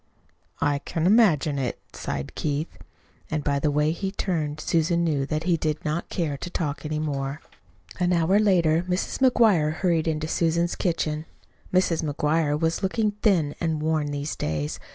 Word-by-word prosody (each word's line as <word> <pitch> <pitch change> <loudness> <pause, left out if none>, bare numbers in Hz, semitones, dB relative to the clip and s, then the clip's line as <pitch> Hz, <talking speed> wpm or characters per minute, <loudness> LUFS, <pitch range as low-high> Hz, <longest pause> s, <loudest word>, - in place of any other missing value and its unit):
"I 145 -1 +2
can 160 +2 -3
imagine 175 - +4
it," 130 -2 -2 0.2
sighed 70 0 -4
Keith. 150 +1 -3 0.5
And 155 -2 -2
by 140 -1 +1
the 150 - +1
way 150 +1 +2
he 190 +3 -3
turned 155 -7 -2
away - - -7
Susan 170 +1 +2
knew 145 -5 0
that 155 +1 -2
he 175 -1 +2
did 155 -1 -2
not 155 +3 -2
care 155 -5 -2
to 175 - -6
talk 150 -5 -3
any 155 0 -2
more. 140 -1 -2 0.6
An 180 0 +2
hour 175 +3 +3
later 170 -6 +3
Mrs. 180 +1 -1
McGuire 220 - +4
hurried 170 -2 +1
into 155 -1 -1
Susan's 170 +1 +1
kitchen. 160 -4 -1 0.5
Mrs. 180 -3 +2
McGuire 150 0 0
was 165 0 0
looking 210 +2 +1
thin 165 -9 +2
and 160 -2 0
worn 155 -2 +1
these 145 +1 -3
days. 75 -1 -3
160 Hz, 170 wpm, -25 LUFS, 150-175 Hz, 0.6 s, imagine